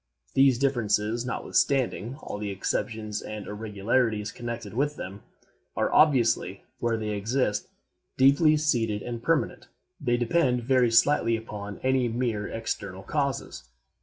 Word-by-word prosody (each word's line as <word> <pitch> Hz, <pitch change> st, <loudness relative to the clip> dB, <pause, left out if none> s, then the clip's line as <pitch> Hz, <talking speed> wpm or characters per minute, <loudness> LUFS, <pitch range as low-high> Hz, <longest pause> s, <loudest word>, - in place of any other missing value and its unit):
These 135 Hz, -2 st, +5 dB
differences, 115 Hz, -3 st, 0 dB
notwithstanding 125 Hz, -2 st, 0 dB
all 105 Hz, -, -5 dB
the 105 Hz, -1 st, -3 dB
exceptions 105 Hz, +2 st, -3 dB
and 105 Hz, -1 st, -7 dB
irregularities 105 Hz, +1 st, -1 dB
connected 120 Hz, -3 st, -6 dB
with 145 Hz, +5 st, 0 dB
them, 100 Hz, -2 st, -7 dB, 0.6 s
are -, -, +1 dB
obviously, 120 Hz, -, +3 dB, 0.2 s
where 115 Hz, -1 st, 0 dB
they 110 Hz, -1 st, -3 dB
exist, 105 Hz, +1 st, -1 dB, 0.5 s
deeply 145 Hz, +4 st, +5 dB
seated 115 Hz, -9 st, 0 dB
and 120 Hz, -1 st, -5 dB
permanent. 165 Hz, +4 st, 0 dB, 0.4 s
They 120 Hz, 0 st, +2 dB
depend 125 Hz, 0 st, +1 dB
very 125 Hz, -1 st, +3 dB
slightly 115 Hz, 0 st, +3 dB
upon 105 Hz, -2 st, -7 dB
any 130 Hz, -1 st, +2 dB
mere 115 Hz, -3 st, -1 dB
external 100 Hz, -4 st, -5 dB
causes. 135 Hz, -, -3 dB
115 Hz, 125 wpm, -27 LUFS, 105-130 Hz, 0.6 s, These